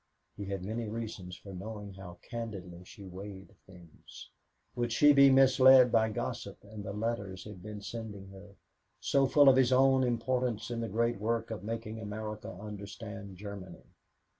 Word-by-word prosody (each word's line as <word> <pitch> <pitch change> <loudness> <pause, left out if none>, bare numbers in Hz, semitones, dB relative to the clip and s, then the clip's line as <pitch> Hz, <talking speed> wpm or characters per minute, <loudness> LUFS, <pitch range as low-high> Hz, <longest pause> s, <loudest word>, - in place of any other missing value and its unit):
He 100 - -6
had 95 -2 -4
many 110 +2 -3
reasons 105 -5 -6
for 100 - -11
knowing 105 +1 -7
how 90 -2 -10
candidly 95 -7 -6
she 100 +1 -12
weighed 95 +1 -9
things. 90 -4 -14 0.4
Would 120 -1 -1
she 145 +5 +6
be 140 -1 +8
misled 130 -1 +7
by 110 -1 +3
gossip 105 - -4
and 105 0 -9
the 100 - -5
letters 100 -3 -3
he'd 105 -4 -10
been 105 +1 -8
sending 105 -4 -7
her, 100 +1 -13 0.4
so 135 -1 +2
full 145 +1 +5
of 130 -1 +8
his 130 -1 +4
own 130 0 +5
importance 125 -1 -1
in 115 -1 -2
the 115 - -3
great 115 +1 0
work 115 +1 -1
of 105 -4 -5
making 115 0 -5
America 105 0 -6
understand 100 0 -8
Germany? 100 -1 -9
110 Hz, 165 wpm, -31 LUFS, 100-120 Hz, 0.4 s, be